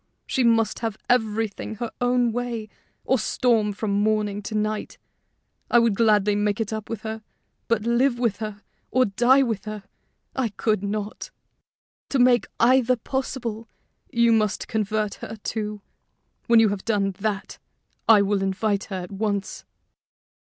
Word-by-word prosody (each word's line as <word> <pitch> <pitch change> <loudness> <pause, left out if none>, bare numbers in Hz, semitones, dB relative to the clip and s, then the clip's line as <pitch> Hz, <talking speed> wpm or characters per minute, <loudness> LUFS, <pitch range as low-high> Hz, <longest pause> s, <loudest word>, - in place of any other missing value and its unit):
She 260 - 0
must 225 -2 +2
have 225 -2 -3
everything 220 -2 0
her 235 +1 -4
own 245 -1 +2
way, 235 -2 -3 0.4
or 265 - +2
storm 225 -3 +1
from 205 +1 -3
morning 205 0 +1
to 210 +2 -6
night. 215 0 -2 0.7
I - - +5
would 230 -2 +4
gladly 210 -1 +3
make 205 0 0
it 220 -1 -2
up 215 -1 -5
with 230 -2 -4
her, 220 0 -5 0.5
but 230 -2 +1
live 240 +2 +2
with 235 -4 0
her, 215 -2 -6 0.3
or 255 +1 +3
die 245 +6 +4
with 225 -5 -2
her, 215 -1 -6 0.5
I 260 -4 0
could 215 -1 0
not. 205 +1 -4 0.8
To 275 - 0
make 245 -1 +4
either 255 +1 +4
possible, 235 -2 -4 0.4
you 235 -2 +4
must 215 -2 +1
convert 215 -1 -1
her, 220 - -6
too. 210 -2 -4 0.6
When 235 -1 +6
you 225 -1 +5
have 200 -1 -3
done 205 -3 +1
that, 205 -1 -3 0.5
I 210 -3 +8
will 200 0 0
invite 195 +1 0
her 190 -2 -5
at 180 - -10
once." 200 0 -3
220 Hz, 150 wpm, -24 LUFS, 205-235 Hz, 0.8 s, I